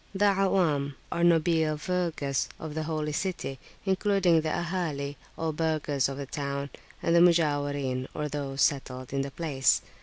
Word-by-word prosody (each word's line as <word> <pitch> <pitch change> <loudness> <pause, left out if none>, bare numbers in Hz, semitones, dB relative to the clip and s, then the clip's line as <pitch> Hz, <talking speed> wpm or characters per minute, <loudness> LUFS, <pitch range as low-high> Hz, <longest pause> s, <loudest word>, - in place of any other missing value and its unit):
The 200 +1 +4
Awam, 160 -8 +2 0.2
or 170 - 0
nobile 165 -2 +3
vulgus 155 -5 -1
of 155 -2 -6
the 160 - -2
Holy 155 -1 -1
City, 150 -5 -3 0.3
including 190 -3 +3
the 155 - -2
Ahali, 155 -5 -2 0.2
or 160 -1 -1
burghers 150 -4 0
of 135 - -5
the 140 - -4
town, 140 0 -4 0.3
and 170 - +3
the - - +7
Mujawirin, 145 -6 +2
or 150 -1 -2
those 140 -2 -1
settled 130 -2 -1
in 135 - +1
the 140 - -3
place. 140 -3 +1
150 Hz, 155 wpm, -28 LUFS, 140-170 Hz, 0.3 s, the